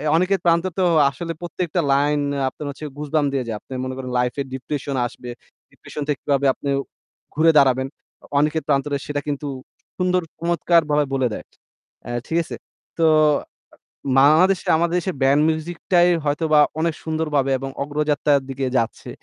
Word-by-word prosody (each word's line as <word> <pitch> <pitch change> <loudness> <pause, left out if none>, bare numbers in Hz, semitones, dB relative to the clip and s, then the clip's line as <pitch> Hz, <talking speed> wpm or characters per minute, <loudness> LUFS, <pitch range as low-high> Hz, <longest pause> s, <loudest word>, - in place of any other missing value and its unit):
"অনিকেত 185 +3 +2
প্রান্তর" 170 +2 +2
তো 185 - +3 0.2
আসলে 165 +3 -5
প্রত্যেকটা 175 0 -2
লাইন 145 +1 +2 0.3
আপনার 150 - -9
হচ্ছে 140 +2 -7
goosebump 150 0 0
দিয়ে 135 -3 -1
যায়। 110 -2 -3
আপনি - - -11
মনে 130 0 -4
করেন 130 -1 -6
লাইফে 125 +3 -1
ডিপ্রেশন 140 +1 -4
আসবে, 120 +1 -11 0.4
ডিপ্রেশন 150 - -9
থেকে 150 -2 -1
কিভাবে 140 -1 +1
আপনি 140 - -5 0.7
ঘুরে 160 +2 +5
দাঁড়াবেন? 130 -1 +4 0.4
অ - - -14
অনিকেত 150 +2 +1
প্রান্তরে 140 0 +1
সেটা 145 -1 -2
কিন্তু 145 0 -3 0.5
সুন্দর 180 0 +1 0.2
চমৎকার 170 0 +2
বলায় 145 -1 +2
বলে 130 -2 +2
দেয়। - - -7 0.6
অ্যা 120 - -5
ঠিক 165 - -1
আছে? - - -7 0.4
তো 165 - +4 0.4
আ - - -15 0.7
বাংলাদেশে 165 +7 +4
আমাদের 170 +1 0
দেশে 185 - -3
ব্যান্ড 140 +2 +4
মিউজিকটাই 175 +2 +1 0.2
হয়তোবা 150 +1 +2 0.2
অনেক 165 0 +1
সুন্দরভাবে 150 -4 0
এবং 135 - -5
অগ্রযাত্রার 145 -1 +1
দিকে 135 0 -3
যাচ্ছে, 115 0 -2
150 Hz, 155 wpm, -21 LUFS, 140-165 Hz, 0.7 s, ঘুরে